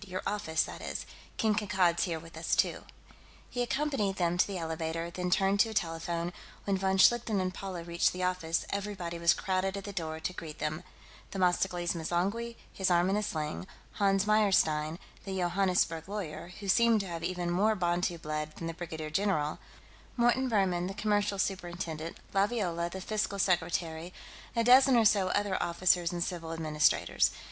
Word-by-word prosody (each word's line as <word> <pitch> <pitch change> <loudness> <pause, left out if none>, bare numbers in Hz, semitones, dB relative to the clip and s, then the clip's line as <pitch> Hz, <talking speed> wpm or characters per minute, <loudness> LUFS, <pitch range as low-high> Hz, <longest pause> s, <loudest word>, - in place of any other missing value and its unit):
"Your 185 0 -4
office, 160 -6 0
that - - -8
is. - - -4 0.3
King 220 -1 +2
Kankad's 190 -4 +2
here 170 -3 -2
with 165 +1 -13
us, 160 0 0
too." - - +1 0.7
He 245 - -2
accompanied 250 -6 0
them 175 -2 +1
to 180 - +3
the 195 -2 -4
elevator, 165 0 -3
then 180 +1 -3
turned 195 +2 +2
to 225 - +5
a 220 - -7
telephone; 170 -1 -2 0.3
when 200 - 0
von 190 0 +1
Schlichten 225 0 +4
and 185 0 -1
Paula 185 -3 -6
reached 170 0 +1
the 180 0 -4
office, 180 -3 0
everybody 195 -4 -4
was 170 0 +4
crowded 190 +1 -1
at 200 - -6
the 200 0 -7
door 160 -4 -3
to 180 - -3
greet 155 -3 -8
them: 155 +2 -2 0.5
Themistocles 180 -2 +1
M'zangwe, 190 +8 -1 0.2
his 190 -1 0
arm 175 +1 +3
in - - +2
a 210 - +1
sling; 160 -3 -3 0.3
Hans 195 -1 +3
Meyerstein, 170 -7 +3 0.3
the 190 -1 -4
Johannesburg 180 -2 +1
lawyer, 180 -4 -5
who 200 - -6
seemed 230 +2 +5
to 195 - -6
have 165 -2 -5
even 175 0 -2
more 210 +5 +3
Bantu 175 -1 0
blood 155 -1 -4
than 165 - -6
the 165 - -3
brigadier 160 -2 -6
general; 160 -5 0 0.6
Morton 240 +2 +3
Buhrmann, 185 -5 +1
the 195 - -5
Commercial 210 -1 +1
Superintendent; 175 -4 -3 0.2
Laviola, 195 -5 0
the 190 +2 -7
Fiscal 210 0 -1
Secretary; 175 -2 0 0.4
a 230 - +2
dozen 255 +2 +7
or 230 - +4
so 205 -3 +4
other 200 0 0
officers 175 0 +2
and 175 -1 -1
civil 165 -3 -4
administrators. 155 -2 +2
180 Hz, 175 wpm, -30 LUFS, 170-200 Hz, 0.7 s, dozen